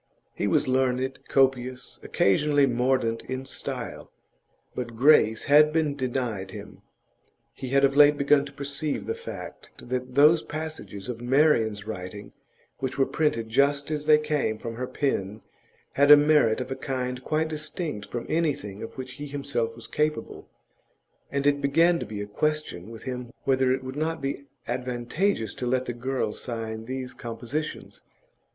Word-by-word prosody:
He - - -1
was - - +2
learned, 130 0 +1
copious, 130 -2 +1
occasionally 145 +8 +3
mordant 125 -2 +1
in 130 +1 -4
style; - - -5 0.6
but 120 -2 -5
grace 115 -4 +5
had 150 +1 +6
been 155 -3 +1
denied 125 -7 -2
to - - -10
him. - - -10 0.7
He 130 - -6
had 140 +1 +4
of 135 0 +1
late 145 0 +7
begun 140 0 +4
to 140 - -9
perceive 140 +2 -3
the 450 - -1
fact 465 +1 -8
that 125 0 -5
those 155 +3 +6
passages 155 -10 -6
of 120 -2 -5
Marian's 120 -6 +2
writing 100 -1 -7 0.5
which 130 -1 -3
were 135 - +4
printed 115 -9 0
just 140 +4 +2
as 150 -1 -3
they 155 - +8
came 150 -8 -1
from 115 +1 -6
her 125 +2 -4
pen 105 -8 -2 0.5
had 140 +1 +3
merit 145 -6 +4
of 125 - -6
a - - -1
kind 130 -1 -3
quite 155 +3 0
distinct 155 - -5
from 120 -1 -4
anything 145 -12 -1
of 115 - -8
which 130 -1 -6
he 145 - -4
himself 140 -5 -2
was 115 -1 -11
capable, 150 -6 -2 0.8
and 140 0 -1
it 145 0 +3
began 165 +5 +3
to - - -5
be 105 -1 -5
a - - -5
question 110 - -2
with 115 -1 -10
him 125 -2 -5
whether 130 -1 +2
it 130 0 0
would 130 +1 -6
not 160 +2 -1
be 140 0 -4 0.2
advantageous 125 - -1
to 125 - -4
let 130 +1 +1
the 120 - -3
girl 125 -1 -2
sign 110 -2 -5
these 130 0 -5
compositions. 120 +6 -5
130 Hz, 160 wpm, -26 LUFS, 120-145 Hz, 0.8 s, they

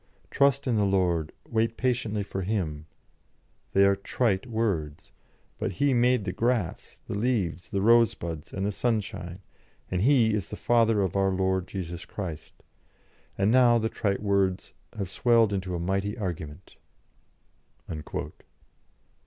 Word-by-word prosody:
'Trust 140 0 +3
in 120 -4 +1
the 105 - +3
Lord, 90 -5 +1 0.2
wait 115 0 0
patiently 115 -5 0
for 95 -1 -5
Him' 85 -7 -2 0.9
they 100 0 +5
are 100 0 +4
trite 100 +2 -1
words. 100 -11 -2 0.5
But - - -2
He 140 +9 +2
made 120 -3 +3
the 90 - -1
grass, 115 -2 -2
the - - -4
leaves, 100 -6 -1
the 100 -2 -1
rosebuds, 100 -9 +2
and 95 0 -3
the 105 - 0
sunshine, 100 -5 -2 0.5
and 90 -1 0
He 120 -2 +4
is 105 -2 -1
the 105 - -7
Father 115 -2 +3
of 95 -1 -2
our 95 0 +3
Lord 95 -1 0
Jesus 85 -3 -6
Christ. 85 -6 -7 0.8
And 100 +2 +2
now 120 -1 +6
the 110 -1 0
trite 100 -2 -2
words 100 -2 0 0.2
have 100 -3 -2
swelled 115 +2 +3
into 95 -2 -2
a - - -3
mighty 95 +4 -1
argument." 85 -4 -6
100 Hz, 140 wpm, -27 LUFS, 90-115 Hz, 0.9 s, now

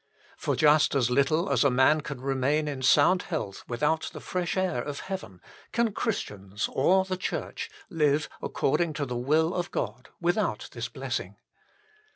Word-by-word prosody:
For - - -1
just 150 -1 +4
as 125 -3 +2
little 140 +6 +2
as 125 -3 +3
a 140 - +5
man 130 +4 +4
can 140 -3 -7
remain 135 +3 +1
in 140 -3 -4
sound 150 +8 +5
health 105 - -4
without 150 +7 0
the - - -7
fresh 180 0 -2
air 185 -9 0
of 145 +2 -5
heaven, 185 - -6 0.3
can 230 -2 +1
Christians 105 - -3
or 190 +7 +3
the 190 0 -2
Church 185 - -4 0.2
live 150 -2 +1
according 155 +3 0
to 145 -1 -2
the 125 -2 -4
will 155 +7 +2
of 175 -1 -2
God 115 +5 -4
without 175 +5 0
this - - -5
bless - - -3
ing. - - -10
150 Hz, 170 wpm, -27 LUFS, 130-175 Hz, 0.3 s, a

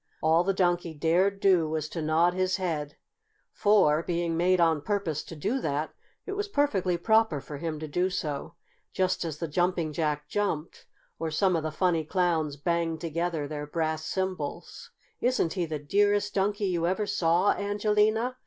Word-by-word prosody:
All 160 +2 +4
the 195 - +1
Donkey 175 -3 0
dared 180 +6 +2
do 180 -6 +3
was 155 -1 -2
to 165 - -4
nod 160 +3 +2
his 185 +1 0
head, 155 -6 -3 0.6
for, 190 -8 +4
being 170 -1 -1
made 180 +2 +3
on 165 -3 +3
purpose 195 -6 -1
to 165 - -9
do 210 - -1
that, 150 -2 -2 0.3
it - - -5
was 410 +1 -2
perfectly 210 - +1
proper 220 -4 +2
for 145 +1 -8
him 160 +1 -4
to 155 - -5
do 180 +5 0
so, 150 -6 -4 0.4
just 185 -1 0
as 160 -3 -4
the 165 - -3
Jumping 170 0 0
Jack 150 -2 -1
jumped, 170 -5 -3 0.3
or 165 0 -2
some 185 +4 +2
of 165 - 0
the 155 0 -3
funny 170 -1 +1
Clowns 160 -3 0
banged 165 +1 -1
together 165 -2 -2
their 150 0 -5
brass 155 0 -2
cymbals. 185 -6 -4 0.3
"Isn't 245 -9 +1
he 180 -4 -1
the 155 -1 -3
dearest 205 +7 +1
Donkey 205 +1 0
you 170 -3 0
ever 190 +4 0
saw, 180 -1 +2
Angelina?" 210 +4 +1
170 Hz, 170 wpm, -28 LUFS, 155-195 Hz, 0.6 s, All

